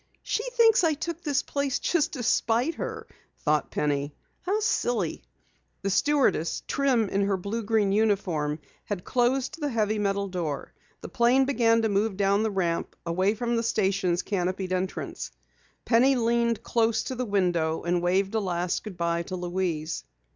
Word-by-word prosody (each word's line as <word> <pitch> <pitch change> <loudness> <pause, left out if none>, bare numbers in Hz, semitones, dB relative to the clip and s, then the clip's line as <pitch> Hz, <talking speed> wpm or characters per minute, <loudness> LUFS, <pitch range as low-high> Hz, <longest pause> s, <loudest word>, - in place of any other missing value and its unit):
"She - - -1
thinks 455 -5 +5
I 320 -2 +3
took 335 +2 -5
this 290 -4 0
place 280 -2 -1
just 340 -4 0
to 255 -5 -4
spite 235 +6 +2
her!" - - -5 0.4
thought 150 -1 +2
Penny. 145 0 -1 0.3
"How 395 +4 0
silly!" 240 - 0 0.6
The 195 - 0
stewardess, 265 - +2
trim 260 -6 +2
in 195 +1 0
her 195 -1 +1
blue 200 +5 -3
green 215 -2 +1
uniform, 190 -8 +1 0.3
had 200 -4 -4
closed 255 +4 0
the 295 - 0
heavy 215 -3 0
metal 200 -1 0
door. 170 -6 -4 0.3
The - - -7
plane 255 +2 +3
began 230 -4 +3
to 220 - +2
move 200 0 0
down 200 +1 +2
the 220 - +1
ramp, 175 -4 -1
away 185 +5 +1
from 235 +2 -1
the 230 - +1
station's 195 -5 +1
canopied 185 -1 -2
entrance. 185 +1 -3 0.6
Penny 260 +3 +4
leaned 235 -1 +1
close 225 -1 +1
to - - -4
the 255 0 -2
window 175 -6 0
and 175 0 +1
waved 190 +3 +1
a 220 - +2
last 180 -3 -1
good 210 -5 -8
bye 170 0 0
to 185 +2 -5
Louise. 175 -3 -2
205 Hz, 165 wpm, -27 LUFS, 180-240 Hz, 0.6 s, thinks